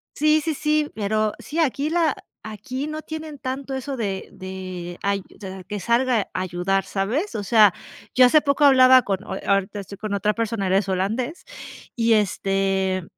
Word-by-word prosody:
Sí, 305 Hz, +1 st, +3 dB
sí, 320 Hz, +1 st, -1 dB
sí, 300 Hz, 0 st, 0 dB
pero 215 Hz, 0 st, 0 dB
sí, 315 Hz, -, -5 dB
aquí 295 Hz, -1 st, +1 dB
la 325 Hz, -3 st, +1 dB, 0.3 s
aquí 220 Hz, +6 st, -6 dB
no 310 Hz, 0 st, -5 dB
tienen 315 Hz, -1 st, -7 dB
tanto 270 Hz, +1 st, -5 dB
eso 265 Hz, +1 st, -4 dB
de 200 Hz, -4 st, -3 dB
de 185 Hz, -2 st, -7 dB
ayu 200 Hz, -1 st, 0 dB, 0.2 s
de 190 Hz, -2 st, -8 dB
que 205 Hz, +2 st, -5 dB
salga 235 Hz, +3 st, +2 dB
a -, -, -2 dB
ayudar, 185 Hz, +2 st, -1 dB
¿sabes? 235 Hz, -, -2 dB
O 210 Hz, -, -3 dB
sea, 210 Hz, -2 st, +5 dB, 0.4 s
yo 255 Hz, -, +7 dB
hace 300 Hz, +5 st, +5 dB
poco 285 Hz, 0 st, +1 dB
hablaba 260 Hz, -2 st, +7 dB
con 195 Hz, -1 st, -2 dB
o -, -, -5 dB
ahorita 195 Hz, +1 st, 0 dB
estoy 200 Hz, 0 st, -9 dB
con 210 Hz, 0 st, -4 dB
otra 210 Hz, +1 st, +1 dB
persona, 225 Hz, -3 st, -2 dB
él 185 Hz, -, +1 dB
es 195 Hz, 0 st, +2 dB
holandés, 225 Hz, -, -2 dB, 0.5 s
y 230 Hz, -1 st, +3 dB
este, 195 Hz, -2 st, 0 dB
215 Hz, 180 wpm, -23 LUFS, 195-270 Hz, 0.5 s, yo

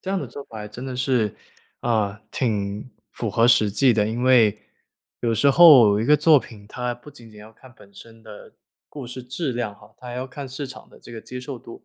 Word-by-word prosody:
这 190 Hz, -, -6 dB
样 195 Hz, -1 st, -1 dB
的 -, -, -5 dB
做 140 Hz, -, -9 dB
法 110 Hz, -2 st, -9 dB
真 120 Hz, +5 st, -9 dB
的 130 Hz, -1 st, -6 dB
是 125 Hz, -6 st, 0 dB, 0.5 s
啊， 105 Hz, -3 st, -1 dB
挺 105 Hz, -2 st, -3 dB, 0.2 s
符 115 Hz, -3 st, -4 dB
合 115 Hz, +3 st, +3 dB
实 110 Hz, -4 st, +4 dB
际 125 Hz, +4 st, +3 dB
的。 105 Hz, -1 st, +1 dB
因 120 Hz, +2 st, -4 dB
为 115 Hz, -5 st, +4 dB, 0.6 s
有 115 Hz, -1 st, 0 dB
时 140 Hz, +5 st, +3 dB
候 130 Hz, -10 st, +7 dB
一 110 Hz, -, -1 dB
个 150 Hz, +3 st, +5 dB
作 155 Hz, -2 st, +5 dB
品， 105 Hz, -5 st, -13 dB
它 125 Hz, +2 st, -4 dB
不 125 Hz, +5 st, -15 dB
仅 120 Hz, -5 st, -16 dB
仅 105 Hz, -, -16 dB
要 110 Hz, +1 st, -14 dB
看 130 Hz, +3 st, -18 dB
本 100 Hz, -2 st, -19 dB
身 115 Hz, +2 st, -15 dB
的 105 Hz, -2 st, -14 dB, 0.3 s
故 140 Hz, -4 st, -9 dB
事 125 Hz, +1 st, -8 dB
质 130 Hz, +3 st, -4 dB
量 115 Hz, -4 st, -4 dB
哈， -, -, -20 dB
它 125 Hz, -, -11 dB
还 120 Hz, -, -6 dB
要 130 Hz, +1 st, -4 dB
看 135 Hz, +1 st, -9 dB
市 135 Hz, +2 st, -6 dB
场 130 Hz, -, -12 dB
的 -, -, -19 dB
这 120 Hz, -, -14 dB
个 110 Hz, -, -8 dB
接 125 Hz, -, -8 dB
受 125 Hz, 0 st, -7 dB
度。 115 Hz, -, -13 dB
120 Hz, 255 characters per minute, -22 LUFS, 110-130 Hz, 0.6 s, 候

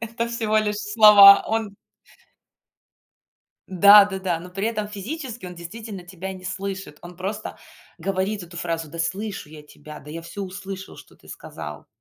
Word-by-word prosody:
это 230 Hz, 0 st, -4 dB
всего 225 Hz, -2 st, -1 dB
лишь 210 Hz, -1 st, -1 dB
слова. 210 Hz, -2 st, +8 dB
Он 220 Hz, -2 st, -2 dB, 1.9 s
Да, 200 Hz, +3 st, +8 dB
да-да. 190 Hz, -4 st, -3 dB
Но 175 Hz, +2 st, -11 dB
при 195 Hz, +3 st, -2 dB
этом 215 Hz, -2 st, -3 dB
физически 235 Hz, -, -7 dB
он 180 Hz, -, -9 dB
действительно 190 Hz, +3 st, -9 dB
тебя 190 Hz, +1 st, -7 dB
не 185 Hz, -1 st, -12 dB
слышит. 190 Hz, -4 st, -6 dB
Он 175 Hz, 0 st, -11 dB
просто 200 Hz, +4 st, -6 dB, 0.4 s
говорит 195 Hz, +3 st, -2 dB
эту 170 Hz, 0 st, -13 dB
фразу: 165 Hz, -2 st, -3 dB
"Да 170 Hz, -, -10 dB
слышу 190 Hz, +1 st, -4 dB
я 150 Hz, 0 st, -12 dB
тебя. 150 Hz, 0 st, -13 dB
Да, 150 Hz, -, -13 dB
я 165 Hz, +2 st, -7 dB
всё 200 Hz, +4 st, -7 dB
услышал, 190 Hz, 0 st, -8 dB
что -, -, -16 dB
ты -, -, -22 dB
сказал". -, -, -9 dB
195 Hz, 160 wpm, -23 LUFS, 175-210 Hz, 1.9 s, слова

